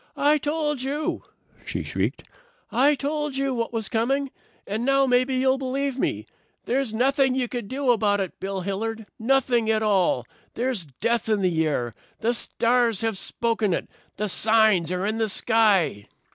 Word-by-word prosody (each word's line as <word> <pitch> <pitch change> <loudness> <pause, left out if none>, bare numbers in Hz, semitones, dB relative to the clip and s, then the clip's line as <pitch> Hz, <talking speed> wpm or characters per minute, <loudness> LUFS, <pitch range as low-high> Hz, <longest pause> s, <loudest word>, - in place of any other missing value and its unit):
"I 295 +1 +3
told 295 -1 -1
you," 290 +4 -2 0.4
she - - -4
shrieked. - - -2 0.5
"I 275 +5 +4
told 295 0 -2
you 275 -1 0
what 230 -2 -2
was 225 -2 -2
coming, 270 +4 0 0.3
and 215 +3 -3
now 275 +1 +3
maybe 255 +1 +2
you'll 260 +1 +2
believe 270 0 -2
me. - - -1 0.4
There's 265 -1 0
nothing 265 +3 +2
you 255 -2 0
can 240 -3 -5
do 265 +1 +1
about 205 -3 +2
it, 190 -3 -4
Bill 195 0 -3
Hilliard. 220 +4 -3
Nothing 240 -2 +2
at 220 0 +2
all. 190 - +2 0.3
There's 240 -6 -1 0.2
death 230 0 0
in 210 -3 +1
the 160 -3 +2
air. 120 -6 -2 0.3
The 235 +2 +1
stars 235 -2 +1
have 225 -2 0
spoken 220 -1 -1
it. - - -4 0.3
The 210 +1 -1
signs 215 -4 +3
are 180 +1 -1
in 220 +2 -1
the 220 -1 +1
sky." 200 - +2
230 Hz, 165 wpm, -24 LUFS, 210-265 Hz, 0.5 s, I